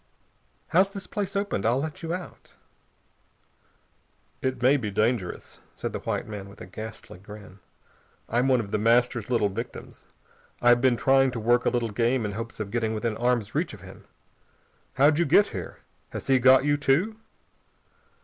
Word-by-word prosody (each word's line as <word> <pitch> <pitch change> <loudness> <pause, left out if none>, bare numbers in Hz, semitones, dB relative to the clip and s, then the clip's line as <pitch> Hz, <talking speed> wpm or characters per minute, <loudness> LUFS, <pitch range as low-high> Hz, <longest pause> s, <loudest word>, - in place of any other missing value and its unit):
"How's 190 +3 +4
this 195 -1 -8
place 200 0 -4
opened? 200 - -1
I'll 120 +4 +2
let 150 +1 -5
you 165 -1 -4
out." 180 0 -7 1.9
"It 130 -1 -2
may 130 +3 +4
be 120 -7 -2
dangerous," 105 -1 -2 0.2
said - - -5
the - - -3
white - - -3
man 100 -2 -7
with 100 - -15
a - - -8
ghastly 110 -4 -9
grin. 100 -1 -12 0.7
"I'm 120 +3 +1
one 130 -2 +4
of 100 -3 -5
The 105 - 0
Master's 120 0 +2
little 115 -5 +2
victims. 115 +5 -8 0.5
I've 120 0 +5
been 125 -2 +3
trying 135 +1 +4
to 115 - -4
work 120 +2 +2
a - - +6
little 120 -2 -1
game 115 +2 +1
in 105 - -2
hopes 115 +3 -7
of 105 -2 -4
getting 110 -2 -1
within 110 0 -2
arm's 120 -2 0
reach 155 -5 -1
of 100 - -16
him. 95 0 -13 0.9
How'd 145 +4 +4
you 170 - +3
get 185 +8 +5
here? - - -7 0.3
Has - - -7
he 135 -1 +3
got 130 +2 +6
you 145 0 +2
too?" 165 +11 +1
120 Hz, 175 wpm, -26 LUFS, 110-135 Hz, 1.9 s, a